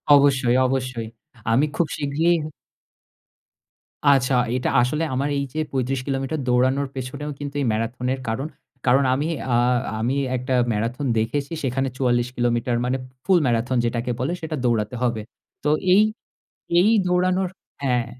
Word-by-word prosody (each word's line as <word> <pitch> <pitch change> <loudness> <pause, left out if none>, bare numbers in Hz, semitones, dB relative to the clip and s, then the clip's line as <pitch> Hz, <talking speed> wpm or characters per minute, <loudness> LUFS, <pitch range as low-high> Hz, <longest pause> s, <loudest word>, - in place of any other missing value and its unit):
অবশ্যই, 135 -4 +4
অবশ্যই। 125 -3 -2 0.4
আমি 130 +6 +4
খুব 170 - +1
শিগগিরই 160 +4 +1 1.7
আচ্ছা, 135 -2 +4 0.2
এটা 130 - 0
আসলে 150 +6 0
আমার 135 +3 0
এই 140 - 0
যে, 155 - -2
৩৫ 130 0 -1
কিলোমিটার 135 +2 -2
দৌড়ানোর 130 +3 +2
পেছনেও 130 +3 -5
কিন্তু 145 -1 -6
এই - - 0
ম্যারাথনের 125 +4 -2
কারণ। 115 +6 -2 0.4
কারণ 135 +2 +4
আমি 145 +4 0 0.3
আ - - +4 0.4
আমি 120 +4 0 0.2
একটা 130 +1 -2 0.2
ম্যারাথন 115 +6 -2
দেখেছি, 140 +7 -1
সেখানে 135 +1 0
৪৪ 120 -2 +2
কিলোমিটার 120 0 +1
মানে 130 +1 0 0.3
ফুল 185 -2 +5
ম্যারাথন 120 +1 +1
যেটাকে 120 +1 -1
বলে, 130 +7 -1
সেটা 160 -1 -3
দৌড়াতে 115 -1 0
হবে। 115 -3 0 0.4
তো 150 - +2 0.2
এই, 200 - +7 0.8
এই 205 +5 +4 0.2
দৌড়ানোর 185 +1 +2 0.4
হ্যাঁ। 125 -3 +1
130 Hz, 140 wpm, -23 LUFS, 120-145 Hz, 1.7 s, এই